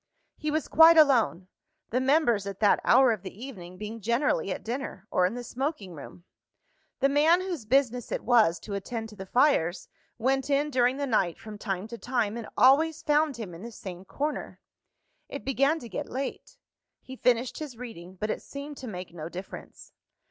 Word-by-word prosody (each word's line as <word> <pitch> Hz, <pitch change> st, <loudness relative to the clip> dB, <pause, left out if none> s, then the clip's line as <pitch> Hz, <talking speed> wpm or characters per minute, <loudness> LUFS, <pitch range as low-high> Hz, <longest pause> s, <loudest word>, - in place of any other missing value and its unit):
He 305 Hz, -, -3 dB
was 310 Hz, +1 st, -1 dB
quite 325 Hz, +1 st, +7 dB
alone; 245 Hz, -, +4 dB, 0.4 s
the 250 Hz, -, +2 dB
members, 260 Hz, -7 st, +2 dB
at 195 Hz, -1 st, -6 dB
that 205 Hz, -2 st, +4 dB
hour 255 Hz, 0 st, +6 dB
of 215 Hz, -5 st, -2 dB
the 190 Hz, +2 st, -9 dB
evening, 185 Hz, -9 st, -9 dB
being 215 Hz, +2 st, -7 dB
generally 235 Hz, -, +1 dB
at -, -, -4 dB
dinner, 235 Hz, -5 st, -5 dB
or 180 Hz, -, +3 dB
in 205 Hz, -, -5 dB
the 245 Hz, -, -5 dB
smoking 245 Hz, -, -4 dB
room. 165 Hz, +3 st, -11 dB, 0.8 s
The 275 Hz, -, +5 dB
man 305 Hz, +5 st, +4 dB
whose 350 Hz, -, -4 dB
business 250 Hz, 0 st, +1 dB
it -, -, -2 dB
was 220 Hz, -8 st, +4 dB
to 205 Hz, -, -7 dB
attend 225 Hz, +3 st, -4 dB
to 210 Hz, -, -13 dB
the 190 Hz, -1 st, -8 dB
fires, 245 Hz, -, +2 dB, 0.3 s
went 265 Hz, +3 st, 0 dB
in 290 Hz, +1 st, +1 dB
during 250 Hz, 0 st, +2 dB
the 285 Hz, -, -1 dB
night, 195 Hz, -9 st, +1 dB
from 215 Hz, -1 st, -10 dB
time 195 Hz, -1 st, -3 dB
to 235 Hz, 0 st, -8 dB
time, 235 Hz, -4 st, -1 dB
and 235 Hz, -2 st, -6 dB
always 305 Hz, +5 st, +4 dB
found 300 Hz, -2 st, +2 dB
him 210 Hz, -7 st, -6 dB
in 165 Hz, -, -10 dB
the 235 Hz, +2 st, -8 dB
same 185 Hz, -4 st, -8 dB
corner. 295 Hz, +9 st, -4 dB, 0.7 s
It -, -, -7 dB
began 275 Hz, +4 st, +2 dB
to 245 Hz, -, -9 dB
get 200 Hz, -, -5 dB
late. 270 Hz, +2 st, -5 dB, 0.5 s
He 260 Hz, -, -9 dB
finished 250 Hz, -1 st, +1 dB
his 290 Hz, -7 st, -7 dB
reading; 190 Hz, -7 st, -9 dB
but 215 Hz, +3 st, -2 dB
it -, -, -4 dB
seemed 280 Hz, +1 st, -8 dB
to 260 Hz, -, -8 dB
make 180 Hz, -5 st, -7 dB
no 160 Hz, -1 st, -6 dB
difference. 185 Hz, +2 st, -10 dB
240 Hz, 190 wpm, -28 LUFS, 200-275 Hz, 0.8 s, quite